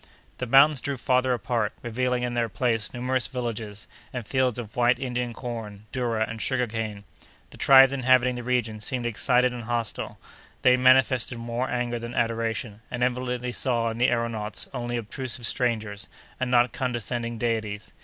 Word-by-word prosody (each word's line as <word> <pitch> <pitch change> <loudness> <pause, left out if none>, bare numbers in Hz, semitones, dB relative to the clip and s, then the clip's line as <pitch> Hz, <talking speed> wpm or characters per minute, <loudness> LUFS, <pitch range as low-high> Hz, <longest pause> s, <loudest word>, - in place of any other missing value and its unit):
The 125 - -3
mountains 135 +3 +6
drew 140 -2 -3
farther 130 +1 +2
apart, 115 -2 -1
revealing 125 +1 -1
in 125 0 -2
their 120 -1 0
place 115 -1 0
numerous 125 +1 -1
villages, 115 -4 -5 0.3
and 125 -3 -5
fields 130 0 +1
of 110 -3 -7
white 120 0 +3
Indian 125 -2 -2
corn, 110 -4 -7
doura, 115 -4 0
and 115 -1 -6
sugar 130 -2 +1
cane. 110 -3 -5 0.5
The - - -13
tribes 135 0 +7
inhabiting 130 -1 +3
the 125 - -5
region 120 -3 -1
seemed 120 +3 -1
excited 125 +2 +2
and 120 -2 -7
hostile; 120 -1 -3 0.5
they 125 0 +6
manifested 130 -1 +4
more 120 +2 -3
anger 120 -1 -1
than 120 +1 -7
adoration, 115 -2 -1
and 125 0 -2
evidently 125 0 -1
saw 120 -2 0
in 115 - -7
the 125 - +4
aëronauts 115 -4 -1
only 120 -1 -3
obtrusive 120 +2 -4
strangers, 110 -4 -1 0.3
and 130 -1 -1
not 120 -1 +3
condescending 120 -1 -2
deities. 110 -3 -2
120 Hz, 165 wpm, -26 LUFS, 115-125 Hz, 0.5 s, tribes